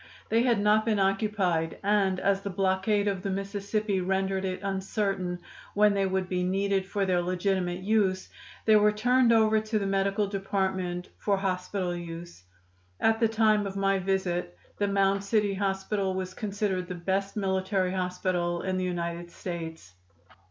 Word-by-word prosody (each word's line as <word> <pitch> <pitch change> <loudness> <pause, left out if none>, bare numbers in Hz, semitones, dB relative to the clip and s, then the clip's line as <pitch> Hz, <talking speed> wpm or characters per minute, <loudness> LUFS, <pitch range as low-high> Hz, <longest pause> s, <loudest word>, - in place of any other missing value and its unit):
They 225 +1 +3
had 240 -3 +3
not 210 +1 +4
been 220 -2 +1
occupied, 195 -4 +1
and 195 -2 +2
as 195 0 +1
the 200 - -4
blockade 195 +2 +1
of 195 -2 -1
the 195 - -3
Mississippi 200 +1 -1
rendered 190 +1 0
it 185 +1 -3
uncertain 195 -2 -1 0.4
when 210 0 +5
they 195 -1 +1
would 190 -1 -1
be 180 -1 -1
needed 195 +1 0
for 200 0 -1
their 180 -2 +2
legitimate 180 0 -1
use, 195 -2 +1 0.4
they 220 - +6
were 210 0 +5
turned 245 +3 +3
over 220 -1 +4
to 215 0 -2
the 200 - -1
medical 195 +1 +1
department 190 -2 -2
for 200 -2 +1
hospital 185 -1 -2
use. 170 - -8 0.6
At 225 0 +3
the 230 - +4
time 215 -2 +2
of 195 - -6
my 195 0 +2
visit 180 - -1 0.2
the 205 - +2
Mound 195 0 +2
City 205 -1 +1
hospital 195 0 -1
was 185 0 -4
considered 200 -3 -2
the 180 - -5
best 195 +4 -2
military 190 -1 0
hospital 180 -2 -1
in 185 -1 -1
the 185 - -1
United 170 -1 -3
States. 165 - -7
195 Hz, 160 wpm, -28 LUFS, 185-205 Hz, 0.6 s, they